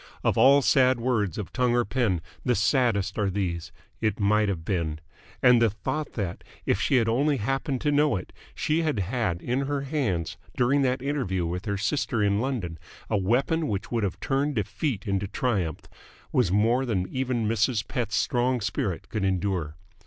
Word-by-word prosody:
Of - - +2
all 135 +4 +6
sad 130 -2 +4
words 115 -8 0
of 105 - -5
tongue 125 -1 +2
or 120 - +2
pen 100 -6 0 0.2
the 125 -2 +2
saddest 110 -3 +1
are 100 -2 +1
these 85 -4 -3 0.3
"It 110 -2 0
might 105 +1 +3
have 85 -4 -3
been!" 85 -5 -1 0.4
and 125 -2 +6
the 115 - +5
thought 150 +8 -4
that, 95 -6 -4 0.2
if 100 - +1
she 135 - +2
had 115 -3 +3
only 140 +5 +2
happened 135 +4 -1
to 150 - +1
know 145 -2 +3
it, 90 - -6 0.2
she 155 +2 +1
had 155 -7 0
had 100 -3 -1
in 130 +3 -1
her 145 -1 -1
hands 100 - -2 0.2
during 130 +3 +3
that 130 -1 0
interview 120 -12 -1
with 90 +4 -4
her 100 -2 -1
sister 120 -1 0
in 100 +1 +2
London 110 -11 -3 0.3
a 105 - +3
weapon 135 - +1
which 105 +1 -3
would 115 -2 0
have 95 - -2
turned 140 +1 0
defeat 110 +2 -2
into 100 -1 -1
triumph 95 - -1 0.5
was 120 -9 +2
more 115 +6 +3
than 100 -8 -1
even 125 -4 -1
Mrs. 110 0 +1
Pett's 110 -6 -2
strong 125 +4 +1
spirit 100 -4 -2
could 110 -3 -3
endure. 95 -5 -1
115 Hz, 180 wpm, -26 LUFS, 95-130 Hz, 0.5 s, all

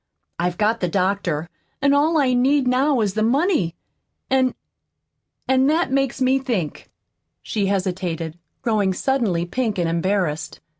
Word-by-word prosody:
I've 175 0 -1
got 220 +2 +1
the 180 - 0
doctor, 180 -3 -1 0.3
an' 280 0 +3
all 310 +3 +3
I 265 -4 +3
need 260 +2 +3
now 260 +1 +2
is 205 -3 0
the 215 - -1
money. 240 - +1 0.6
An' 260 -1 +2 0.9
an' 265 0 +3
that 315 -1 +1
makes 270 -1 0
me 260 +1 +3
think." 225 - -3 0.5
She 205 -3 -1
hesitated, 180 -4 -2 0.2
growing 210 -5 +1
suddenly 215 -9 0
pink 220 +2 -2
and 175 -2 0
embarrassed. 170 -2 -1
220 Hz, 140 wpm, -22 LUFS, 180-265 Hz, 0.9 s, an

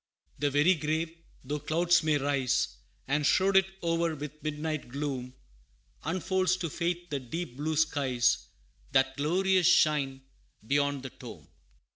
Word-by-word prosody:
The 145 - +2
very 145 +6 +4
grave, 160 +1 -2 0.3
though 145 +3 -3
clouds 170 +4 +2
may 155 -2 +2
rise, 140 -2 +1 0.4
And 145 +2 +1
shroud 190 +6 +3
it 190 0 +6 0.2
o'er 165 -1 +1
with 150 +1 -8
midnight 155 -1 -3
gloom, 130 -2 -4 0.7
Unfolds 185 +2 0
to 170 -4 -4
faith 175 +1 -2
the 140 - -1
deep 135 +2 -6
blue 155 +2 -1
skies, 140 -6 +1 0.5
That 135 0 +3
glorious 180 +5 +2
shine 145 -6 +3 0.4
beyond 140 +1 +1
the 130 - -6
tomb. - - -11
150 Hz, 135 wpm, -29 LUFS, 140-170 Hz, 0.7 s, it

